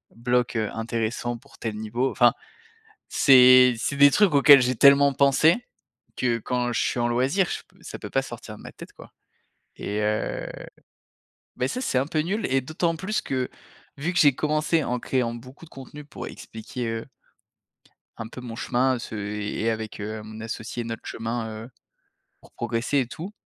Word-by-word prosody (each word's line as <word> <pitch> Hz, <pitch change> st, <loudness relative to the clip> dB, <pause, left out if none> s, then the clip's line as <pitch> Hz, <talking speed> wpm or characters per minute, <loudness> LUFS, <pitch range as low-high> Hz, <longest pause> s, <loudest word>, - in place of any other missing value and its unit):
bloc, 120 Hz, +1 st, 0 dB
heu, 110 Hz, -2 st, -1 dB
intéressant 115 Hz, +1 st, -3 dB
pour -, -, -20 dB
tel 110 Hz, -2 st, -4 dB
niveau». 115 Hz, +5 st, -2 dB
Enfin, 120 Hz, -1 st, +4 dB, 0.8 s
c'est 130 Hz, -2 st, +7 dB
c'est 140 Hz, +4 st, -3 dB
des 140 Hz, 0 st, +7 dB
trucs 205 Hz, -5 st, +4 dB
auxquels 140 Hz, -1 st, +7 dB
j'ai 125 Hz, 0 st, 0 dB
tellement 140 Hz, +2 st, +6 dB
pensé 140 Hz, +4 st, +4 dB, 0.6 s
que 120 Hz, -2 st, 0 dB
quand 125 Hz, +1 st, -2 dB
je 115 Hz, -, 0 dB
suis 120 Hz, -, -1 dB
en 120 Hz, -, +1 dB
loisir, 130 Hz, +11 st, +1 dB
je -, -, -4 dB
p -, -, -29 dB
ça -, -, -8 dB
peut -, -, -8 dB
pas -, -, +1 dB
sortir -, -, -9 dB
de -, -, -15 dB
ma -, -, -9 dB
tête, -, -, -12 dB
quoi. -, -, -15 dB, 0.7 s
Et 105 Hz, +1 st, -3 dB
heu, 105 Hz, 0 st, -2 dB, 1.1 s
bah, 125 Hz, -, -1 dB
ça, 255 Hz, -, -4 dB
c'est 130 Hz, -, -1 dB
un 135 Hz, -, -1 dB
peu 155 Hz, -, -1 dB
nul 195 Hz, +8 st, -2 dB
et 135 Hz, 0 st, +2 dB
d'autant 165 Hz, +5 st, -1 dB
plus 195 Hz, +5 st, -2 dB
que 130 Hz, -2 st, -2 dB, 0.5 s
vu 150 Hz, +6 st, -2 dB
que -, -, -3 dB
j'ai 145 Hz, -2 st, +6 dB
commencé 155 Hz, +1 st, 0 dB
en 125 Hz, -1 st, -2 dB
créant 125 Hz, -3 st, -1 dB
beaucoup 130 Hz, +7 st, -12 dB
de -, -, -19 dB
contenus 145 Hz, +2 st, -11 dB
pour -, -, -7 dB
expliquer, 115 Hz, +2 st, -7 dB
heu 115 Hz, 0 st, -4 dB, 1.1 s
un 115 Hz, -, -7 dB
peu 125 Hz, -, -10 dB
mon 120 Hz, -2 st, -8 dB
chemin, 130 Hz, +1 st, 0 dB
ce 110 Hz, -, -7 dB
et 105 Hz, +1 st, -4 dB
et 115 Hz, -, +1 dB
avec, 110 Hz, -1 st, -5 dB
heu, 110 Hz, +1 st, -5 dB
mon 110 Hz, +1 st, -10 dB
associé 115 Hz, +1 st, -5 dB
notre 115 Hz, 0 st, -6 dB
chemin, 115 Hz, 0 st, -4 dB, 0.2 s
heu, 120 Hz, -, -13 dB, 0.7 s
pour -, -, -20 dB
progresser 120 Hz, +4 st, -1 dB
et 130 Hz, -, -1 dB
tout, 180 Hz, +10 st, -8 dB
125 Hz, 185 wpm, -24 LUFS, 115-140 Hz, 1.1 s, c'est